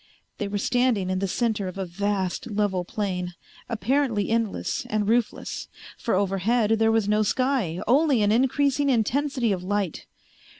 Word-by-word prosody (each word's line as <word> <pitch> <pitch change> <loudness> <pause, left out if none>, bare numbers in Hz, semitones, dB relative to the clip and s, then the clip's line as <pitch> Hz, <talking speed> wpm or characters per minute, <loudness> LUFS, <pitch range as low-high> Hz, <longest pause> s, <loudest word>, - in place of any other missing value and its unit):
They 205 - -1
were 205 +1 -2
standing 235 -4 +1
in 185 - 0
the 195 - -1
center 215 -1 -1
of 185 - -7
a 190 - -2
vast 190 +3 -2
level 205 -3 0
plain, 180 -2 -3 0.3
apparently 230 -1 0
endless 230 -3 -1
and 210 -1 -1
roofless, 235 +1 -1 0.3
for 230 - -1
overhead 200 +4 +1
there 225 0 +4
was 225 -2 +2
no 210 +1 +3
sky, 235 -7 0
only 270 -2 +3
an 205 - +3
increasing 275 +4 +2
intensity 255 0 +1
of 185 -2 -2
light. 195 -3 -2
210 Hz, 155 wpm, -25 LUFS, 195-245 Hz, 0.3 s, there